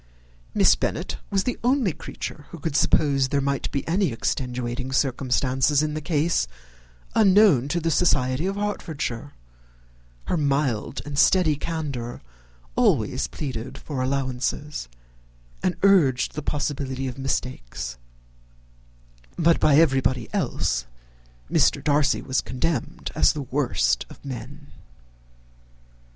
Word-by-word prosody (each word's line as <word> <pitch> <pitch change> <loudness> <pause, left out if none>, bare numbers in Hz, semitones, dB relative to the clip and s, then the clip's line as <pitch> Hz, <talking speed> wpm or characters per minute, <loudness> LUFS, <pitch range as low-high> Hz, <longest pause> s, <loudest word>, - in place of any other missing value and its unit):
Miss - - +6
Bennet - - -2
was 195 -1 +1
the 250 - -2
only 245 - +2
creature 150 0 -7
who 170 - -9
could 160 -1 -4
suppose 140 -3 +3
there 140 - +1
might 140 -1 -1
be 140 - -3
any 180 -1 +1
extenuating 125 +2 -3
circumstances 130 +1 +1
in 150 -1 -1
the 155 - -3
case 155 - +1 0.7
unknown 195 - +5
to 170 +4 0
the 165 0 0
society 145 -1 +2
of 195 - -2
Hertfordshire: 160 - -3 0.9
her - - 0
mild 140 -5 0
and 145 -1 -3
steady 175 -5 +4
candour 140 -7 -4 0.6
always - - +2
pleaded 130 -2 -5
for 140 -3 -5
allowances, 130 - -2 0.7
and 185 -1 0
urged 160 -11 +4
the 150 - -4
possibility 135 -3 -2
of 130 +1 -6
mistakes; 60 - -3 1.4
but 165 0 +4
by 145 - +4
everybody 135 -6 +3
else - - -1 0.6
Mr. - - +3
Darcy 145 -1 +2
was 130 0 0
condemned 130 +1 -3
as - - +4
the 150 - -4
worst 120 - 0
of - - -15
men. 135 +3 -7
140 Hz, 120 wpm, -24 LUFS, 130-160 Hz, 1.4 s, Miss